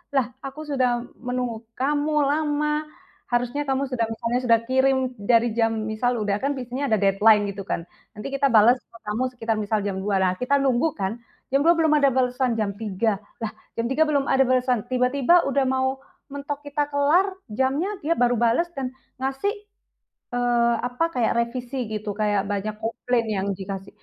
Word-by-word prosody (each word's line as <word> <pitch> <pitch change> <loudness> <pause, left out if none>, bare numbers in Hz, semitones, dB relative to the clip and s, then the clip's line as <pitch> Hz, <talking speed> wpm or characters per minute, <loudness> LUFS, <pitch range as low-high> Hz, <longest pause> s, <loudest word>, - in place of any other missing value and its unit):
"Lah, 255 -2 +1
aku 275 +3 -7
sudah 255 -5 0 0.2
menunggu 245 -2 -3
kamu, 290 +3 0
lama, 300 +1 0 0.4
harusnya 245 +4 0
kamu 270 +1 +1
sudah 230 -3 0
misalnya 235 +2 -1
sudah 230 -1 +5
kirim 265 +1 +3 0.2
dari 230 +3 +3
jam" 225 -1 +3 0.2
misal 245 +3 0
udah 205 0 0
kan 280 +1 -1
biasanya 255 +2 -4
ada 220 - +3
deadline, 205 +2 +5
gitu 195 0 -7
kan. 170 - -2 0.3
Nanti 210 +5 -6
kita 275 0 +2
bales 235 +1 +5
ke 230 - -18
kamu 210 +4 -2
sekitar 225 -2 -1
misal 215 +1 0
jam 195 -2 -2
2.00, 200 +1 -1
nah, 185 - +2
kita 255 +3 +1
nunggu 270 +1 +2
kan, 200 +3 -3 0.3
jam 275 - +3
2.00, 340 - +7
belum 320 -2 +2
ada 280 - +4
balesan, 250 -1 +1
jam 210 -3 -1
3.00, 210 -1 -1 0.2
"Lah, 215 - -2 0.2
jam 230 - -1
tiga 310 +3 +3
belum 285 -2 +2
ada 270 0 +5
balesan," 250 -3 +1
tiba-tiba 260 +7 +3
udah 275 0 +1
mau 260 0 0 0.3
mentok 285 +1 -5
kita 290 0 -1
kelar, 295 +7 +3 0.2
jamnya, 265 - 0
dia 325 +3 +1
baru 245 0 +3
bales 235 +8 +3
dan 265 -3 -3 0.3
ngasih, 270 +10 -1 0.8
eee, 240 -1 +2
apa 250 +7 0
kayak 245 -8 0
revisi 240 +1 -2
gitu, 210 -1 -4
kayak 205 -1 0
banyak 205 +1 -3
komplain 230 +2 -1
yang 200 -3 -2
dikasih. 195 0 -6
250 Hz, 175 wpm, -24 LUFS, 220-275 Hz, 0.8 s, 2.00